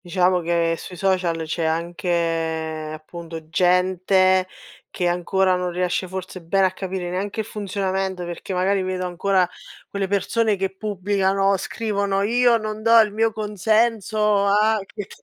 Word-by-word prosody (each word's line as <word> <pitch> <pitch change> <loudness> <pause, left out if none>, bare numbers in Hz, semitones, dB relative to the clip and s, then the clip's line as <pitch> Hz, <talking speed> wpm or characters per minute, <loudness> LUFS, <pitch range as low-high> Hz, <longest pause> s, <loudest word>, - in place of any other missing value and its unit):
Diciamo 180 +1 +2
che 170 -1 +1
sui 180 - -9
social 180 -3 0
c'è 165 +2 -3
anche 165 -1 -1
appunto 160 0 -9
gente 185 +1 +3 0.4
che 180 - -1
ancora 185 +2 +1
non 180 0 -2
riesce 180 +1 -1
forse 185 0 -7
bene 190 +4 +2
a 185 - +2
capire 185 -1 -4
neanche 200 +4 -2
il - - -7
funzionamento, 190 -3 -3
perché 175 +3 -7
magari 190 +2 +1
vedo 185 0 -2
ancora 180 +1 +1 0.4
quelle 200 -1 -2
persone 210 +3 +1
che 190 0 -3
pubblicano, 195 -1 +1
scrivono: 200 -1 -1
"io 240 +2 +4
non 215 -1 -5
do 230 +1 +6
il 215 -2 +3
mio 225 +1 +2
consenso," 215 0 +1
ah 215 +2 +3
che 205 -1 -7
che - - -14
190 Hz, 145 wpm, -22 LUFS, 175-205 Hz, 0.4 s, do